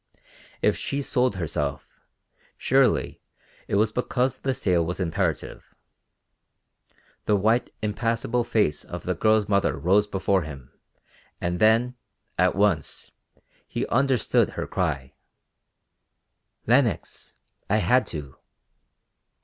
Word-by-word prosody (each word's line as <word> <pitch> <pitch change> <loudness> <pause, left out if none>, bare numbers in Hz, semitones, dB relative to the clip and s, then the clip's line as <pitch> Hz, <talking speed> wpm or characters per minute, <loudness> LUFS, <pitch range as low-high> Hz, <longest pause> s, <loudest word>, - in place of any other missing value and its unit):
If - - +3
she 140 0 -3
sold 125 -5 +1
herself, 75 -5 -3 0.7
surely - - +2 0.5
it - - -1
was 110 +1 +3
because 125 +2 -1
the 135 -1 -1
sale 90 -3 +1
was 90 +3 -3
imperative. 85 -4 -3 1.5
The 105 - +3
white 110 +5 +2
impassible 115 +3 0
face 105 -10 0
of - - -8
the - - -1
girl's 110 -1 +2
mother 100 -1 +1
rose 100 +4 +3
before 95 -1 +1
him 70 -5 -9 0.7
and 90 0 -2
then, 115 +3 +3 0.4
at 90 0 +3
once, 100 -7 0 0.6
he - - -2
understood 135 -1 +2
her - - -5
cry, 75 -8 -2 1.5
"Lenox, 125 -1 0 0.3
I 105 - +3
had 125 +4 +3
to." 70 -4 -7
105 Hz, 110 wpm, -25 LUFS, 90-120 Hz, 1.5 s, If